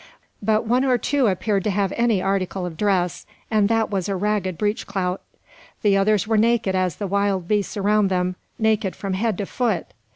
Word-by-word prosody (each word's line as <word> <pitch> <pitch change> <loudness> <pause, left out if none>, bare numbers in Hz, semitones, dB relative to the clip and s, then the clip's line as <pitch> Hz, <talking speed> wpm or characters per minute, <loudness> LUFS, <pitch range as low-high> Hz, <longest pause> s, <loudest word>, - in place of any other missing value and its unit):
But 215 +2 +1
one 245 +3 +2
or 255 -2 +3
two 275 +1 +1
appeared 195 0 0
to - - +2
have 200 -1 0
any 230 -5 +2
article 195 -1 -1
of 175 -2 -6
dress, 185 -2 0 0.2
and 210 -2 +3
that 225 -1 +1
was 195 -1 -1
a 195 - 0
ragged 190 -2 -1
breech 210 +3 -1
clout. 190 -2 -2 0.6
The 205 -2 +4
others 200 +1 +2
were 220 0 +2
naked 230 -3 +2
as 185 -4 0
the 205 - -4
wild 200 -2 0
beasts 210 0 0
around 205 0 +3
them, 180 -1 0 0.2
naked 215 -3 +1
from 195 -1 -4
head 210 +1 0
to 200 - -2
foot! 220 -5 -2
200 Hz, 195 wpm, -22 LUFS, 190-215 Hz, 0.6 s, The